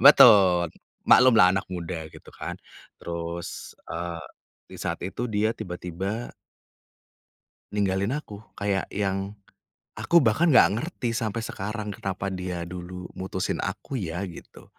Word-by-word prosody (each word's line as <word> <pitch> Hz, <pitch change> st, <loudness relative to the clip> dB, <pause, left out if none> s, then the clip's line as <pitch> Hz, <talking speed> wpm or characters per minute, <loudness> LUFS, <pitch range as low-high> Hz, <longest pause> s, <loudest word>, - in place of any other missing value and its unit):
betul. 100 Hz, -, +8 dB, 0.3 s
Maklum 125 Hz, -2 st, +7 dB
lah 90 Hz, -4 st, +7 dB
anak 95 Hz, -1 st, -2 dB
muda 85 Hz, -3 st, -5 dB
gitu -, -, -15 dB
kan -, -, -6 dB, 0.4 s
terus, 85 Hz, 0 st, -6 dB
eee, 85 Hz, 0 st, -4 dB, 0.5 s
di -, -, -8 dB
saat -, -, -2 dB
itu 120 Hz, +6 st, -3 dB
dia 110 Hz, +1 st, +1 dB
tiba-tiba 95 Hz, +5 st, -5 dB, 1.4 s
ninggalin 100 Hz, +2 st, +1 dB
aku 110 Hz, -8 st, -6 dB, 0.2 s
kayak 100 Hz, -1 st, +1 dB
yang, 95 Hz, 0 st, -1 dB, 0.7 s
aku 170 Hz, -, +2 dB
bahkan 115 Hz, +11 st, +3 dB
enggak 110 Hz, -, +6 dB
ngerti 140 Hz, -8 st, -3 dB
sampai 115 Hz, -1 st, -2 dB
sekarang 105 Hz, +1 st, -4 dB
kenapa 95 Hz, 0 st, -3 dB
dia 90 Hz, -2 st, -4 dB
dulu 90 Hz, +1 st, -7 dB
mutusin 95 Hz, 0 st, -3 dB
aku 135 Hz, -3 st, -4 dB
ya? 90 Hz, +1 st, -3 dB
Gitu. 90 Hz, -3 st, -11 dB
95 Hz, 125 wpm, -26 LUFS, 90-110 Hz, 1.4 s, betul